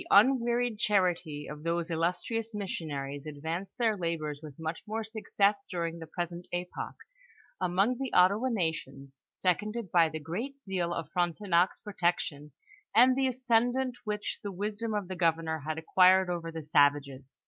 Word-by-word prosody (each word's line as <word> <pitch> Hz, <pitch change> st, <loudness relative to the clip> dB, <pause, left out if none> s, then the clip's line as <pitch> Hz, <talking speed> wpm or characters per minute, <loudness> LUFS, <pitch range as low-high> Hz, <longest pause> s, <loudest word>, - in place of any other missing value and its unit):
8T 350 Hz, -, -10 dB
The -, -, +5 dB, 0.3 s
nnVearied 240 Hz, -2 st, 0 dB
charity 180 Hz, -8 st, +1 dB
of 150 Hz, 0 st, -8 dB
those 170 Hz, +1 st, -1 dB
illustrious 180 Hz, +7 st, -1 dB
missionaries 145 Hz, -7 st, -4 dB
ad 150 Hz, -, -6 dB
vanced 165 Hz, +6 st, -4 dB
their 225 Hz, -3 st, +2 dB
labors 165 Hz, -5 st, -3 dB
with 150 Hz, -3 st, -10 dB
much 160 Hz, +1 st, -4 dB
more 220 Hz, +1 st, -2 dB
success 205 Hz, -2 st, 0 dB
during 170 Hz, -2 st, -3 dB
the 160 Hz, -, -8 dB
pres 175 Hz, +2 st, -3 dB
ent 175 Hz, +1 st, -9 dB
epoch, 175 Hz, 0 st, -4 dB, 0.7 s
among 195 Hz, +7 st, +2 dB
the 270 Hz, -2 st, -3 dB
Ottawa 200 Hz, +8 st, +4 dB
nations, 140 Hz, -, -3 dB
seconded 210 Hz, +2 st, -1 dB
by 165 Hz, -2 st, +5 dB
the 155 Hz, -, -5 dB
great 205 Hz, -, -4 dB
zeal 180 Hz, -3 st, -1 dB
of 165 Hz, -3 st, -4 dB
Frontenac's 175 Hz, +1 st, +1 dB
protection, 170 Hz, -6 st, -1 dB, 0.4 s
and 250 Hz, +3 st, +7 dB
the 265 Hz, 0 st, +2 dB
ascendant 250 Hz, 0 st, +1 dB
which 210 Hz, -1 st, -3 dB
the 205 Hz, -, -4 dB
wisdom 210 Hz, +3 st, -3 dB
of 205 Hz, -3 st, -2 dB
the 185 Hz, -, -5 dB
governor 165 Hz, -2 st, +1 dB
had 155 Hz, +2 st, -4 dB
acquired 185 Hz, +3 st, +5 dB
over 165 Hz, -1 st, -3 dB
the 160 Hz, -2 st, -7 dB
savages. 145 Hz, -2 st, +2 dB
180 Hz, 160 wpm, -30 LUFS, 160-210 Hz, 0.7 s, and